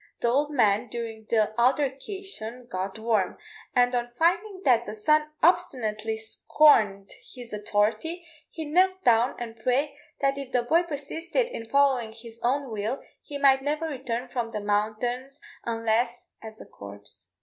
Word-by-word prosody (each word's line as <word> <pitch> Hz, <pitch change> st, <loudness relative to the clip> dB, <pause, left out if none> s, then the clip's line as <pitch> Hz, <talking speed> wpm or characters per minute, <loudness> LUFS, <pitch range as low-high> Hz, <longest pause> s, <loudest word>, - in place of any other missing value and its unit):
The 235 Hz, -, +2 dB
old 285 Hz, +4 st, +2 dB
man 225 Hz, -5 st, +2 dB
during 225 Hz, -1 st, -6 dB
the 215 Hz, -2 st, +2 dB
altercation 270 Hz, -, -1 dB
got 190 Hz, -2 st, -4 dB
warm; 220 Hz, -4 st, 0 dB, 0.4 s
and 245 Hz, 0 st, +4 dB
on 240 Hz, -1 st, -1 dB
finding 375 Hz, -, +1 dB
that 240 Hz, -3 st, +4 dB
the 210 Hz, -, -5 dB
son 305 Hz, +7 st, +2 dB
obstinately 225 Hz, -11 st, +1 dB
scorned 220 Hz, -3 st, +3 dB, 0.2 s
his 245 Hz, -3 st, -8 dB
authority, 215 Hz, -, -1 dB, 0.2 s
he 320 Hz, -1 st, -6 dB
knelt 370 Hz, +4 st, +2 dB
down 235 Hz, +1 st, +4 dB
and 230 Hz, -1 st, -7 dB
prayed 265 Hz, +5 st, +1 dB, 0.3 s
that 275 Hz, 0 st, +1 dB
if 270 Hz, -2 st, -8 dB
the 245 Hz, -1 st, +2 dB
boy 325 Hz, +8 st, +3 dB
persisted 330 Hz, -, -2 dB
in 230 Hz, -, -6 dB
following 265 Hz, -5 st, +2 dB
his 230 Hz, 0 st, -11 dB
own 265 Hz, +1 st, 0 dB
will, 215 Hz, +4 st, -2 dB, 0.2 s
he 290 Hz, -, -6 dB
might 270 Hz, -1 st, +5 dB
never 300 Hz, +3 st, -1 dB
return 255 Hz, -5 st, -4 dB
from 240 Hz, -2 st, -3 dB
the 220 Hz, -2 st, -4 dB
mountains 220 Hz, +7 st, -1 dB, 0.3 s
unless 230 Hz, +1 st, 0 dB, 0.2 s
as 220 Hz, -1 st, -10 dB
a -, -, -10 dB
corpse. 100 Hz, -2 st, -11 dB
245 Hz, 150 wpm, -26 LUFS, 220-285 Hz, 0.4 s, might